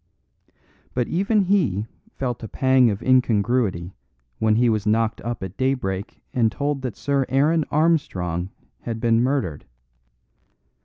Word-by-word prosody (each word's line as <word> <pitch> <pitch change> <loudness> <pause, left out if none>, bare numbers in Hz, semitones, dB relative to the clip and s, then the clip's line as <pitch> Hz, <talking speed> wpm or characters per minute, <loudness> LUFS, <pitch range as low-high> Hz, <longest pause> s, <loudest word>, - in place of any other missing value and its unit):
But 125 -1 0
even 200 +4 +1
he 180 - +1 0.3
felt 125 -3 -3
a 110 - -6
pang 130 +1 +3
of 100 +1 -3
incongruity 115 -7 +1 0.5
when 110 -1 +3
he 120 +2 +3
was 110 -2 0
knocked 110 +1 +1
up 120 -3 -4
at 95 +1 -7
daybreak 125 -7 -2
and 115 -3 +2
told 145 0 -2
that 130 -4 -5
Sir 140 -1 0
Aaron 150 +4 +2
Armstrong 95 - 0 0.3
had 115 -1 -5
been 115 0 +2
murdered. 125 - -1
120 Hz, 135 wpm, -23 LUFS, 105-135 Hz, 0.5 s, pang